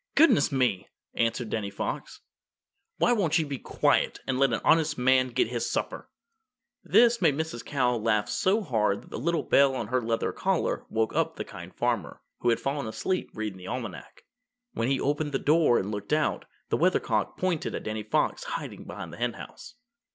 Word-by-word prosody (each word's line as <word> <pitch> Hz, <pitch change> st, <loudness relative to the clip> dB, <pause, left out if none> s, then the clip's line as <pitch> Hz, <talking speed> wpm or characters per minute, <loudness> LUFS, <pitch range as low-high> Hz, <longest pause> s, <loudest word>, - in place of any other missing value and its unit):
"Goodness 300 Hz, -, +5 dB
me!" 125 Hz, -8 st, 0 dB, 0.2 s
answered 115 Hz, 0 st, -1 dB
Danny 105 Hz, -3 st, -2 dB
Fox, 100 Hz, -, -5 dB, 0.8 s
"won't 200 Hz, -10 st, +3 dB
you 160 Hz, -, +1 dB
be 140 Hz, -3 st, -5 dB
quiet -, -, +1 dB
and 130 Hz, -1 st, -1 dB
let 135 Hz, -2 st, +4 dB
an 115 Hz, -, 0 dB
honest 160 Hz, -1 st, +3 dB
man 130 Hz, +1 st, +4 dB
get 125 Hz, -2 st, 0 dB
his 120 Hz, -1 st, -2 dB
supper?" -, -, -3 dB, 0.7 s
This 235 Hz, -1 st, +4 dB
made 155 Hz, -6 st, +4 dB
Mrs. 160 Hz, -7 st, -3 dB
Cow 125 Hz, -4 st, +1 dB
laugh 110 Hz, -1 st, +1 dB
so 190 Hz, -, +1 dB
hard 105 Hz, -, 0 dB
that -, -, -17 dB
the -, -, -4 dB
little 165 Hz, +3 st, 0 dB
bell 140 Hz, -1 st, +4 dB
on 110 Hz, -4 st, -4 dB
her 130 Hz, 0 st, +1 dB
leather 115 Hz, 0 st, -1 dB
collar -, -, -1 dB
woke 110 Hz, 0 st, 0 dB
up 160 Hz, 0 st, +1 dB
the -, -, -5 dB
Kind 90 Hz, -3 st, -10 dB
Farmer, 120 Hz, -5 st, -1 dB, 0.2 s
who 120 Hz, -, +1 dB
had 115 Hz, -, +2 dB
fallen 140 Hz, -2 st, -2 dB
asleep 185 Hz, +11 st, -2 dB
reading 105 Hz, -3 st, -4 dB
the 90 Hz, -, -10 dB
Almanac. 115 Hz, -5 st, -6 dB, 0.5 s
When 115 Hz, -, -1 dB
he 135 Hz, 0 st, +1 dB
opened 145 Hz, +1 st, -1 dB
the -, -, +2 dB
door 150 Hz, -3 st, +4 dB
and 100 Hz, +2 st, -2 dB
looked 105 Hz, +5 st, -3 dB
out, 155 Hz, 0 st, 0 dB, 0.2 s
the -, -, +1 dB
Weathercock -, -, +1 dB
pointed 180 Hz, -4 st, -1 dB
at -, -, -5 dB
Danny 110 Hz, 0 st, -3 dB
Fox 105 Hz, +1 st, 0 dB
hiding -, -, -6 dB
behind -, -, -8 dB
the -, -, -9 dB
Henhouse. 120 Hz, -, -5 dB
125 Hz, 185 wpm, -27 LUFS, 110-155 Hz, 0.8 s, Goodness